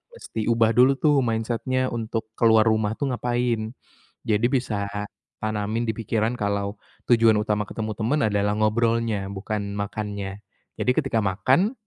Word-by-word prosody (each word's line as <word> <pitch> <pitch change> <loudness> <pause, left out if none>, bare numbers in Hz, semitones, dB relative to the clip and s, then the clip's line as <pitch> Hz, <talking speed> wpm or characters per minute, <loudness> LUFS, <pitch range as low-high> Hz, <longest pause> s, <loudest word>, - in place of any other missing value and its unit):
mesti 110 - -5
ubah 115 -1 +3
dulu 125 +4 +5
tuh 145 0 +3
mindset-nya 120 +2 -1
untuk 110 -1 -4
keluar 110 -1 +6
rumah 110 -1 +1
tuh 140 0 -2
ngapain, 120 -2 -1 0.5
jadi 110 +1 +2
bisa 110 -7 -1 0.5
tanamin 110 +2 -2
di 110 - 0
pikiran 115 +1 -1
kalau 100 -1 -1 0.3
tujuan 115 -2 +5
utama 105 -1 0
ketemu 110 +2 -4
teman 120 +7 0
adalah 105 -1 +1
ngobrolnya 115 -1 +1
bukan 100 +1 -4
makannya 100 -1 -4 0.3
jadi - - +1
ketika 130 -6 0
makan, 130 - +2
110 Hz, 135 wpm, -24 LUFS, 105-120 Hz, 0.5 s, keluar